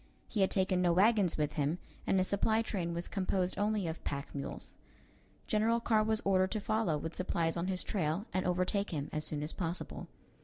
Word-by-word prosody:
He 210 - -1
had 190 - +4
taken 185 -1 +1
no 175 -1 +4
wagons 200 -1 +4
with 150 -1 +1
him, 150 +3 0 0.3
and 195 - +3
his 185 0 +3
supply 220 +3 +2
train 180 -6 -2
was 170 +1 -2
composed 185 -2 0
only 210 -1 +1
of 160 0 -4
pack 140 0 -4
mules. 140 - -4 0.7
General 225 +2 +2
Carr 220 -2 +3
was 220 0 +2
ordered 190 -1 +3
to 215 - -1
follow 210 -6 +1
with 160 +3 -5
supplies 170 -3 0
on 170 +1 -1
his 185 -1 0
trail 175 +1 -1
and 185 0 +1
overtake 185 +3 +1
him 145 -3 -3
as 155 0 -1
soon 150 -1 -1
as 150 - -1
possible. 170 0 -4
185 Hz, 200 wpm, -33 LUFS, 165-205 Hz, 0.7 s, had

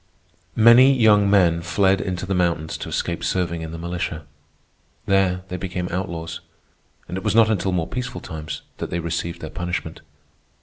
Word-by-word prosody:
Many 120 +4 +7
young 105 -3 +5
men 90 -4 +4
fled 95 +3 +2
into 95 -1 -3
the 95 - -2
mountains 85 -3 0
to - - -6
escape - - -2
serving 85 -2 -1
in 80 0 -6
the 85 - -6
militia. 85 -2 -4 0.8
There 95 -2 +2
they 90 - -4
became 90 0 -4
outlaws, 85 -3 -4 0.7
and 90 - -5
it - - -12
was - - 0
not 115 -1 +5
until 95 -2 0
more 85 -3 0
peaceful 125 +7 -5
times 75 -2 -7
that - - -5
they - - -2
received 85 +1 -3
their 80 - -6
punishment. 90 -1 -4
90 Hz, 170 wpm, -22 LUFS, 85-95 Hz, 0.8 s, Many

